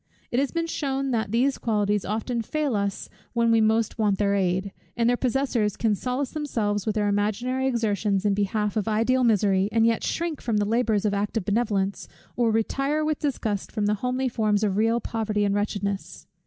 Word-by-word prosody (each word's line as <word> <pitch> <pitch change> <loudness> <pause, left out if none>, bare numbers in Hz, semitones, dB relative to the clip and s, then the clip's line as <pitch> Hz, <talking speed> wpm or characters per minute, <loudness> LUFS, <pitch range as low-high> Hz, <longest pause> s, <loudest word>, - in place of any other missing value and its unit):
It 245 - +1
has 275 0 +1
been 335 -1 -1
shewn, 275 -4 -2
that 220 -4 -1
these 255 +4 +1
qualities 210 -2 0
often 225 +3 -2
fail 290 +1 -1
us 200 -1 -2 0.3
when 235 -1 +2 0.2
most 225 0 0
we - - +1
want 205 -2 +2
their 200 0 +1
aid; 190 0 0 0.3
that 235 - +2
their 245 +1 +4
possessors 245 -5 0
can 220 -2 +2
solace 250 +5 -2
themselves 215 -10 -2
with 215 - 0
their 210 -1 +1
imaginary 215 +6 0
exertions 210 -5 0
in 205 - +3
behalf 205 +1 -1
of 215 0 -1
ideal 230 +4 +2
misery, 200 -4 +3
and 225 0 +3
yet 230 -1 +1
shrink 335 -3 -2
from 230 -3 0
the 205 - +1
labours 220 -1 +1
of 205 - +1
active 205 0 -1
benevolence, 200 -3 0 0.3
or 240 -2 +2
retire 275 +7 0
with 305 -1 -1
disgust 220 -8 -2
from 210 -2 -1
the 205 - +2
homely 255 +1 0
forms 215 -3 +1
of 200 -3 +1
real 225 +3 +2
poverty 215 -2 -1
and 200 - +1
wretchedness. 200 -1 -3
220 Hz, 195 wpm, -25 LUFS, 205-250 Hz, 0.3 s, their